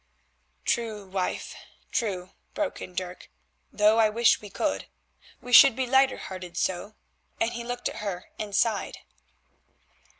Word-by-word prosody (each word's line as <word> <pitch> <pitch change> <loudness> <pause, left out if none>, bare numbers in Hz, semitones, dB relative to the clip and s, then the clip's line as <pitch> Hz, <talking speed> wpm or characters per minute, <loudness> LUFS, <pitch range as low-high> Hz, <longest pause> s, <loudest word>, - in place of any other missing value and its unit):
"True, 220 -4 -1
wife, 190 -1 -3 0.4
true," 185 -5 -2 0.2
broke 305 -3 -2
in 180 - -8
Dirk, 180 0 -5 0.4
"though 210 +1 +4
I 220 -1 +5
wish 230 +2 +3
we 210 - -9
could; - - -2 0.5
we 245 - -7
should 270 0 +9
be 260 0 0
lighter 265 +1 +4
hearted 180 -2 -8
so," 190 +4 -2 0.4
and 225 - +1
he 235 - -5
looked 245 +1 -3
at - - -5
her 195 -3 -5
and 205 -2 -4
sighed. 215 -1 +1
215 Hz, 140 wpm, -27 LUFS, 190-235 Hz, 0.5 s, should